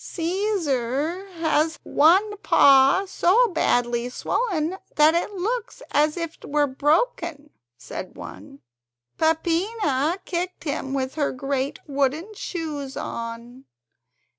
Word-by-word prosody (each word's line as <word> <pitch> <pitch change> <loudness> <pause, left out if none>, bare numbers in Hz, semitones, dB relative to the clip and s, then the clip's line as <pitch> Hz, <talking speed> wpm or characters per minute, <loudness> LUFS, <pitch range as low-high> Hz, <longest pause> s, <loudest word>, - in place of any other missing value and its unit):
"Caesar 335 - -1
has 320 -1 +1
one 380 +8 +4
paw 275 0 +5
so 395 +5 +3
badly 245 -7 +1
swollen 355 - -1 0.2
that 305 +1 +6
it 340 +4 0
looks 455 +6 -3
as 300 +3 +2
if 335 -1 -4
it - - -14
were 295 0 +2
broken," 300 - 0 0.3
said - - -8
one. 95 - -11 0.6
"Peppina 325 - +1
kicked 360 +1 -3
him 275 -2 -3
with 260 -1 -2
her 295 -2 0
great 275 +2 -2
wooden 285 +8 -1
shoes 305 -8 -5
on. 235 +3 -6
310 Hz, 110 wpm, -24 LUFS, 270-360 Hz, 0.6 s, that